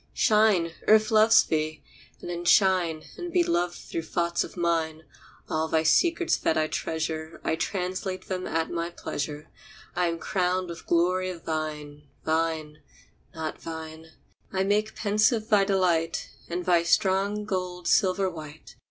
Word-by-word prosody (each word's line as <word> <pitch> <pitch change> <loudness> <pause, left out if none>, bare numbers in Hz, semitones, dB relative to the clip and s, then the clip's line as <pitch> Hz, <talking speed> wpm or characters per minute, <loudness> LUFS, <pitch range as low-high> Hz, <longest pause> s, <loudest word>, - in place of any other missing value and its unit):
Shine, 210 -6 +3 0.2
Earth 215 0 +5
loves 220 0 +6
thee! 155 -2 -2 0.4
And - - -8
then 175 0 -4
shine 175 -3 +3 0.2
And 350 -1 -5
be 355 -1 +3
loved 175 - 0
through 165 - -5
thoughts 170 +1 -1
of - - -10
mine. 165 -2 0 0.4
All 160 0 -1
thy 160 0 +1
secrets 340 - +3
that 160 - 0
I 155 - +2
treasure 160 0 -3
I - - 0
translate 185 +2 -3
them 185 -1 -3
at 165 0 -1
my 170 0 -2
pleasure. 150 -3 -5 0.5
I 180 0 +2
am 165 0 -2
crowned 180 0 -1
with 170 - -9
glory 180 +2 +2
of 175 -3 -8
thine. 150 -2 -4 0.2
Thine, 160 -1 -1 0.6
not 160 -1 -4
thine. 160 0 -8 0.4
I 190 0 0
make 210 +2 0
pensive 215 +1 +1
thy 205 -2 +5
delight, 175 -4 0 0.2
And 175 +1 -3
thy 175 -2 +4
strong 195 +4 +1
gold 180 -3 -3
silver 190 0 +3
white. 155 -3 -9
175 Hz, 150 wpm, -26 LUFS, 160-190 Hz, 0.6 s, loves